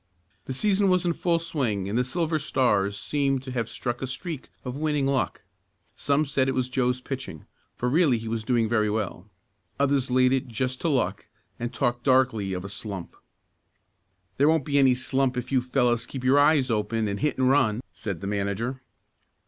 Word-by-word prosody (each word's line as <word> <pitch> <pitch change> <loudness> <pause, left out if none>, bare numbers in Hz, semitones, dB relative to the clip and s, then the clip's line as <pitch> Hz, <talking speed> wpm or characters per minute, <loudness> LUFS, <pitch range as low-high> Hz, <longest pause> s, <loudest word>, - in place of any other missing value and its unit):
The 130 - -4
season 200 +6 +2
was 185 -1 +2
in 170 - +2
full 170 0 +1
swing 125 - -2
and 100 - -3
the 125 - +3
Silver 160 +4 -1
Stars 105 -8 +1
seemed 135 +3 0
to 130 - -6
have 115 -3 -2
struck 120 -1 -4
a 130 - -2
streak 145 +3 -6 0.2
of 125 0 -4
winning 150 -1 0
luck. 135 -2 -1 0.5
Some 145 +2 +1
said 135 -2 +1
it - - 0
was 130 -1 0
Joe's 125 -1 0
pitching, 130 - -6 0.3
for 125 - -2
really 145 -2 +3
he 115 0 -7
was 110 0 -2
doing 115 -1 +1
very 110 -2 +1
well. 105 -2 -3 0.5
Others 140 -2 +2
laid 130 +1 +4
it 135 -1 0
just 125 +2 -3
to 170 - +1
luck 135 -4 0 0.3
and 120 0 -3
talked 120 -2 -1
darkly 130 -7 +2
of 90 +1 -4
a - - -4
"slump." 100 -3 -6 1.2
"There 145 +3 +4
won't 160 -4 +2
be 145 -1 +2
any 130 -2 +5
slump 130 0 0
if 125 +1 -4
you 130 -2 +3
fellows 125 -2 +1
keep 130 -2 -6
your 130 +3 +5
eyes 145 -3 +4
open, 110 0 0
and 100 0 -3
hit 150 0 0
and 130 -1 +2
run," 130 -5 +3
said 100 -5 -5
the - - -5
manager. 105 +6 -2
130 Hz, 195 wpm, -26 LUFS, 115-140 Hz, 1.2 s, any